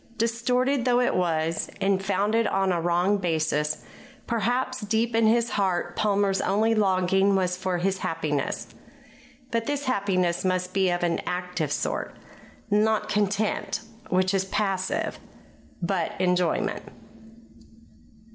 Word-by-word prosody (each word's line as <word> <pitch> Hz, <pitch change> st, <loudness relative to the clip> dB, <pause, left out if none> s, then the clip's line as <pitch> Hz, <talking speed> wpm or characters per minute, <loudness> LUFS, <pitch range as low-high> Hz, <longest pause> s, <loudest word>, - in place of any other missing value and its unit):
Distorted 245 Hz, +3 st, +1 dB
though 245 Hz, -1 st, +3 dB
it 250 Hz, -, +2 dB
was, 165 Hz, -2 st, 0 dB
and 195 Hz, -1 st, +1 dB
founded 205 Hz, +4 st, +1 dB
on 195 Hz, -1 st, +1 dB
a 170 Hz, -2 st, 0 dB
wrong 175 Hz, +4 st, +2 dB
basis, 155 Hz, -3 st, -1 dB, 0.4 s
perhaps, 245 Hz, +3 st, -1 dB
deep 225 Hz, +2 st, 0 dB
in 225 Hz, -1 st, +4 dB
his 235 Hz, +1 st, +2 dB
heart 180 Hz, -3 st, 0 dB
Palmer's 200 Hz, -2 st, +1 dB
only 215 Hz, +4 st, +2 dB
longing 195 Hz, -1 st, +3 dB
was 180 Hz, -1 st, +1 dB
for 185 Hz, -1 st, -2 dB
happiness; 165 Hz, -6 st, -2 dB, 0.8 s
but 230 Hz, -1 st, -1 dB
this 290 Hz, 0 st, -2 dB
happiness 185 Hz, -7 st, 0 dB
must 185 Hz, 0 st, -1 dB
be 190 Hz, -1 st, +2 dB
of 175 Hz, 0 st, -1 dB
an 170 Hz, -1 st, +1 dB
active 180 Hz, -4 st, -2 dB
sort -, -, -2 dB, 0.6 s
not 215 Hz, +1 st, +2 dB
content, 210 Hz, +1 st, 0 dB, 0.3 s
which 185 Hz, +1 st, +2 dB
is 190 Hz, -1 st, +1 dB
passive, 195 Hz, -1 st, -1 dB, 0.6 s
but 170 Hz, -2 st, -1 dB
enjoyment. 180 Hz, -2 st, +1 dB
195 Hz, 120 wpm, -26 LUFS, 180-220 Hz, 0.8 s, in